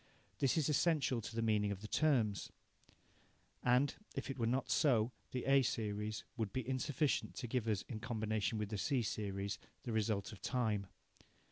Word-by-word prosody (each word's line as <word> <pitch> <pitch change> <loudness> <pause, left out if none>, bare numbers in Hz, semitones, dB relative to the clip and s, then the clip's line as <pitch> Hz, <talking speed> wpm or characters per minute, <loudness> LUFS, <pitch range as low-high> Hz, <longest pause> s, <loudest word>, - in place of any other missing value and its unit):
This 135 +2 +3
is 155 - +3
essential 150 -5 +2
to 110 - -7
the 115 - 0
meaning 105 -2 +2
of 100 -1 -4
the 105 - -6
terms. 115 - +2 1.1
And, 125 +3 +3 0.2
if - - -3
it 135 - -7
were 115 - +2
not 130 +3 0
so, 120 -5 +4 0.2
the 125 - -3
A 135 0 +6
series 105 -2 -2
would 110 -4 -1
be 130 +1 -3
insufficient 135 +2 0
to 125 - -4
give 115 -1 -1
us, 105 -3 +1
in 110 - -6
combination 110 -1 -1
with 105 -1 -2
the 105 -2 -3
C 135 -2 +1
series, 100 -2 -2 0.2
the 120 - -3
result 110 -1 0
of 105 - -11
time. 110 -6 0
115 Hz, 175 wpm, -37 LUFS, 105-130 Hz, 1.1 s, A